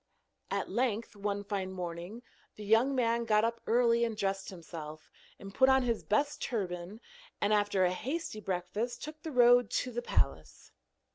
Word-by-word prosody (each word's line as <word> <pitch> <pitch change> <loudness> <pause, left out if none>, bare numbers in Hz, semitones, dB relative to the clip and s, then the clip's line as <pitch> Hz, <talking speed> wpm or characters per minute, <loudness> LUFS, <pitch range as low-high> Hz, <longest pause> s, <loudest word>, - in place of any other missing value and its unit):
At - - -1
length 230 -3 -1
one 205 0 -2
fine 195 -2 -3
morning, 180 +5 -6 0.3
the 210 - -9
young 230 +6 +4
man 235 -2 +1
got 215 -1 +3
up 230 0 -2
early 235 0 +3
and 225 -2 -1
dressed 195 -1 -2
himself, 160 -4 -9 0.3
and 195 0 -10
put 260 +4 +5
on 265 0 +5
his 235 -3 -1
best 285 +8 0
turban, 190 -3 -3 0.4
and 205 +1 +2
after 205 -2 +2
a 180 - +2
hasty 260 - -4
breakfast 200 +5 -3
took 305 0 -8
the 320 - -6
road 245 -3 +6
to 250 +1 -1
the 240 0 -3
palace. - - -2
215 Hz, 165 wpm, -31 LUFS, 195-240 Hz, 0.4 s, road